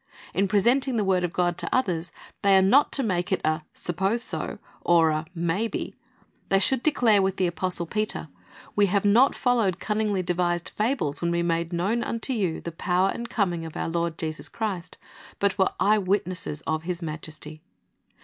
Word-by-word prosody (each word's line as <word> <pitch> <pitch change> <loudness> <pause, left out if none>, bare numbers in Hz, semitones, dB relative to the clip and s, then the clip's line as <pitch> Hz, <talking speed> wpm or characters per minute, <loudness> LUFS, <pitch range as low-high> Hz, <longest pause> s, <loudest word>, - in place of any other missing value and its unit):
In 195 +1 +2
presenting 240 +7 +2
the 210 - +2
word 185 -2 +2
of 175 - -1
God 175 -1 0
to - - -2
others, 180 -10 0 0.3
they 200 -1 +5
are - - +6
not 260 +10 +5
to 275 - +2
make 180 -5 -1
it 190 - +2
a 155 +1 +1
suppose 195 +7 -1
so - - -3 0.2
or 165 -2 +4
a 155 +1 -2
may 170 +6 0
be. - - -4 0.6
They 195 - +4
should 240 +6 +2
declare 240 -9 +3
with 190 0 0
the 185 - +2
apostle 175 0 -2
Peter, 215 -1 -2 0.5
"We 205 -1 +4
have 200 +1 +1
not 235 +7 +5
followed 225 -8 +1
cunningly 210 -3 0
devised 175 -1 0
fables 215 - -1
when 170 0 0
w^e 170 0 0
made 170 0 0
known 195 +8 0
unto 230 +4 -2
you 190 -8 -1
the 170 - -5
power 180 +3 +1
and 235 0 -6
coming 175 -6 0
of 160 -1 -7
our - - -2
Lord 170 -1 -1
Jesus 155 -1 -4
Christ, 195 -6 -4 0.4
but 200 -1 0
were 190 - +4
eye 210 +2 +4
witnesses 185 -5 -2
of 155 0 -1
His 175 +1 -4
majesty." 155 -1 -7
185 Hz, 190 wpm, -26 LUFS, 170-210 Hz, 0.6 s, are